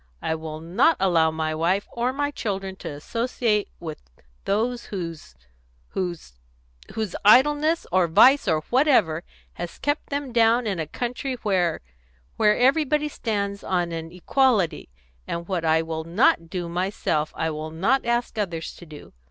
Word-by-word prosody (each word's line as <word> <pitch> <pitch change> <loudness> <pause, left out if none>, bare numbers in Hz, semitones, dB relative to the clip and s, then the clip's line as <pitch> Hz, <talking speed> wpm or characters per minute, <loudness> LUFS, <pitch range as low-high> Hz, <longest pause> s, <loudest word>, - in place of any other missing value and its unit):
I - - 0
will 160 -1 -6
not 210 - +3
allow 170 -4 +3
my 160 0 -2
wife 175 +5 0
or 240 +2 -1
my 285 +2 -1
children 195 -6 -4
to - - -7
associate 215 - -1
with 160 -3 -7 0.4
those 235 +4 0
whose 165 - -7 0.5
whose 170 - -5 0.6
whose 215 -4 -3
idleness, 295 +9 +5
or 185 -1 +3
vice, 260 - +6
or 155 -1 +2
whatever, 235 - +3 0.4
has 175 - -6
kept 290 +2 -2
them 280 -2 -3
down 230 +1 +4
in 195 -5 -2
a 160 - -3
country 250 - -3
where 185 -5 +1 0.5
where 210 -1 +3
everybody 300 +3 +2
stands 200 -6 -3
on 175 -2 -1
an 165 0 -5
equality; 200 - +1 0.4
and 170 0 -4
what 180 -4 -2
I 160 0 +3
will 160 0 -4
not 165 -1 +2
do 175 -1 -4
myself, 170 -3 -1
I 160 - -1
will 155 +1 -5
not 200 +12 +1
ask 235 -1 -1
others 170 -5 -3
to 175 - -13
do. 150 -1 -12
190 Hz, 150 wpm, -24 LUFS, 165-240 Hz, 0.6 s, vice